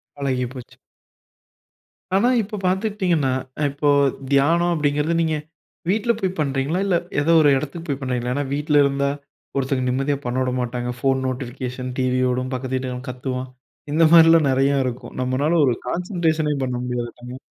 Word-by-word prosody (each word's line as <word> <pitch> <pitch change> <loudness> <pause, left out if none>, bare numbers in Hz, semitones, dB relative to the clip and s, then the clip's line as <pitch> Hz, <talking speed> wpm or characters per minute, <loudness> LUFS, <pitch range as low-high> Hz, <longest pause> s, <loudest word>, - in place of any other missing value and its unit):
பழகி 130 -3 -1
போச்சு. 125 -2 -11 1.4
ஆனா 205 +6 +4
இப்போ 210 0 -6
பார்த்துக்கிட்டிங்கன்னா, 185 - +1 0.4
இப்போ 145 +1 -2 0.4
தியானம் 165 +5 +3
அப்படிங்கிறது, 150 +1 0
நீங்க 160 -1 +1 0.5
வீட்டில 220 +4 +2
போய் 190 -2 -2
பண்றீங்களா? 140 +3 0
இல்ல 185 -3 +2 0.3
ஏதோ 165 +3 +2
ஒரு 145 - +5
இடத்துக்கு 155 +5 -6
போய் 140 0 -1
பண்றீங்களா? 125 -2 -2
ஏன்னா 145 -1 -1
வீட்ல 145 0 +3
இருந்தா, 140 0 0 0.5
ஒருத்தவங்க 130 -1 0
நிம்மதியா 135 +2 0
பண்ண 125 +1 -2
விட 130 -1 0
மாட்டாங்க. 120 0 -3
ஃபோன் 135 +1 +1
நோட்டிஃபிகேஷன், 130 0 -5
டிவியோடும் 130 0 0
பக்கத்து 130 0 -3
வீட்டுக்காரன் 130 0 -4
கத்துவான், 125 0 -4 0.4
இந்த 165 +2 +5
மாரிலாம் 165 -2 +7
நெறயாருக்கும். 130 -2 0
நம்மளால 145 +6 +1
ஒரு 125 - +2
கான்சன்ட்ரேஷனே 165 -3 0
பண்ண 125 - -3
முடியாதுங்க. 125 +1 -5
135 Hz, 135 wpm, -22 LUFS, 130-160 Hz, 1.4 s, மாரிலாம்